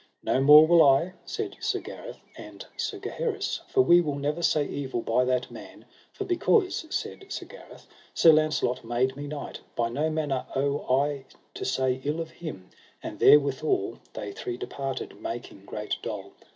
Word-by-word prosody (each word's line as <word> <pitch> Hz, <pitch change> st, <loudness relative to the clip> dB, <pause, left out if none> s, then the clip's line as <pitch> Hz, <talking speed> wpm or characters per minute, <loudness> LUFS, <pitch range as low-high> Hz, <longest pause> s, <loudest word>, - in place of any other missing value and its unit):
No 130 Hz, -, +1 dB
more 150 Hz, +3 st, +9 dB
will 170 Hz, +1 st, +6 dB
I, 150 Hz, +5 st, +4 dB
said -, -, -5 dB
Sir -, -, -1 dB
Gareth -, -, -9 dB, 0.2 s
and -, -, -10 dB
Sir -, -, -3 dB
Gaheris, 420 Hz, -5 st, -3 dB
for 395 Hz, -, +3 dB
we 175 Hz, -, +6 dB
will 150 Hz, -4 st, -2 dB
never 145 Hz, +4 st, -2 dB
say 155 Hz, -3 st, +2 dB
evil 130 Hz, -5 st, -4 dB
by 125 Hz, +3 st, +2 dB
that 125 Hz, 0 st, -1 dB
man; -, -, -12 dB, 0.3 s
for 400 Hz, -, -5 dB
because, 370 Hz, -1 st, +1 dB
said 390 Hz, -, -4 dB
Sir -, -, -5 dB
Gareth, -, -, -14 dB, 0.3 s
Sir 165 Hz, -, +7 dB
Launcelot 155 Hz, -5 st, +1 dB
made 120 Hz, +3 st, 0 dB
me 145 Hz, +1 st, -6 dB
knight, 145 Hz, 0 st, -6 dB, 0.2 s
by 115 Hz, -1 st, 0 dB
no 150 Hz, +7 st, -1 dB
manner 150 Hz, -4 st, -2 dB
owe 140 Hz, +1 st, +1 dB
I 140 Hz, +1 st, +1 dB, 0.3 s
to -, -, -5 dB
say 130 Hz, 0 st, 0 dB
ill 150 Hz, +3 st, -1 dB
of 165 Hz, -1 st, -5 dB
him: 145 Hz, -, -9 dB, 0.3 s
and -, -, -7 dB
therewithal 140 Hz, -6 st, +3 dB
they 105 Hz, -, -6 dB
three 120 Hz, +4 st, -5 dB
departed, 135 Hz, +1 st, -5 dB
making 115 Hz, -4 st, -7 dB
great 105 Hz, +1 st, -4 dB
dole. -, -, -6 dB
145 Hz, 170 wpm, -27 LUFS, 130-160 Hz, 0.3 s, more